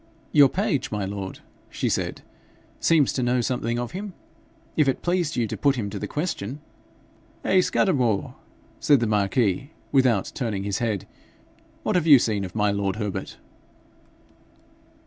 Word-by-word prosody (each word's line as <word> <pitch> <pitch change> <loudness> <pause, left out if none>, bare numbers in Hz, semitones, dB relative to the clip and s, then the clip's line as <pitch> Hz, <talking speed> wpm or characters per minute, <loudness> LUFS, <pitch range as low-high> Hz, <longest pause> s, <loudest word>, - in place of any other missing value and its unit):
'Your 145 -2 +7
page, 175 - -1
my 105 -2 -2
lord,' 95 -1 -6 0.3
she - - -2
said, - - -2 0.6
'seems 155 -5 +3
to 130 - -1
know 125 +1 +2
something 120 -1 -1
of 120 -1 -3
him: 195 +1 -6 0.6
if 150 -3 +3
it 135 - 0
pleased 175 -3 0
you 120 - +1
to 105 - -4
put 140 -1 +2
him 105 -5 -3
to 100 - -5
the - - -4
question 145 - -3 0.4
' - - -32
'Hey, 190 -1 +4
Scudamore!' 125 - +1 0.5
said 145 -3 +4
the 120 - +1
marquis 105 +3 +1 0.2
without 130 -7 +3
turning 110 -7 -2
his 100 -1 -2
head; 110 -6 -1 0.8
'what - - 0
have 170 -2 +2
you 145 -3 +10
seen 105 -4 0
of 95 - -7
my 105 -1 +2
lord 100 -1 -1
Herbert?' 105 -3 -4
120 Hz, 160 wpm, -24 LUFS, 100-145 Hz, 0.8 s, you